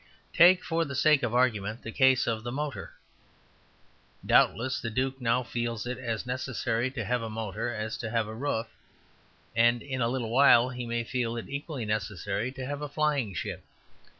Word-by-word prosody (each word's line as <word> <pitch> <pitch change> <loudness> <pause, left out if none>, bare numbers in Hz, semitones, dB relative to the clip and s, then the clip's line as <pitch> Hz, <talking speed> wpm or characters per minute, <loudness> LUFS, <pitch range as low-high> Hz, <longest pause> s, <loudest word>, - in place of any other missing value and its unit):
Take, 180 +1 +6
for 165 0 0
the 140 -4 -5
sake 150 +1 +4
of 120 -1 -1
argument, 110 -3 +1
the 115 - -6
case 130 0 +4
of 110 -2 -1
the 120 - -4
motor. 140 -6 -4 1.3
Doubtless 120 0 +3
the 115 - -3
duke 130 +3 -2
now 125 +1 +2
feels 120 -2 -3
it 125 +1 -4
as 115 -3 -3
necessary 125 -1 -1
to 120 -5 -5
have 125 +2 0
a 115 - -4
motor 110 +1 -3
as 110 -1 -4
to 115 - -4
have 115 -1 0
a 110 - -6
roof, 115 -1 -2 0.9
and 120 +1 +3
in 130 -2 -4
a 115 - +2
little 120 -3 -2
while 125 -1 +6
he 125 -1 -5
may 120 0 -1
feel 120 -1 -2
it 115 - -6
equally 140 -3 -4
necessary 105 +1 -2
to 135 -1 -6
have 145 +2 -4
a 150 - -4
flying 145 - 0
ship. - - -4
120 Hz, 185 wpm, -28 LUFS, 115-130 Hz, 1.3 s, Take